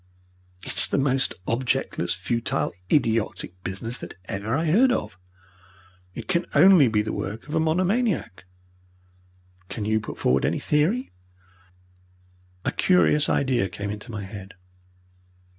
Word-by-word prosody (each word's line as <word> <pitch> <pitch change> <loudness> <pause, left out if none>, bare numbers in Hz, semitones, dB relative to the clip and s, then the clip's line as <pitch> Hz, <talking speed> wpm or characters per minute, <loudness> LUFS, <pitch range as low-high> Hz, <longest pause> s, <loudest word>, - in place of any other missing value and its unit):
"It - - -4
is - - +8
the - - -1
most 135 -1 +1
objectless, 120 -8 -1
futile, 115 +5 -1 0.2
idiotic 110 - 0
business 115 +6 -3
that - - -9
ever 100 +6 -3
I 160 +4 0
heard 230 +12 +4
of. 95 - -3 1.0
It - - -7
can 175 -2 0
only 185 -8 +7
be 105 -2 +1
the 110 - -4
work 110 +7 -5
of 150 - -7
a 160 - +2
monomaniac." 180 - 0 1.2
"Can 105 - -4
you 110 +1 +1
put 110 - -8
forward 65 +1 +2
any - - +1
theory?" 170 - 0 1.5
A - - +1
curious 165 -5 +3
idea 125 -8 +1
came 100 +3 -5
into 105 +3 -8
my 105 -3 -5
head. 95 0 -9
120 Hz, 135 wpm, -24 LUFS, 105-155 Hz, 1.5 s, is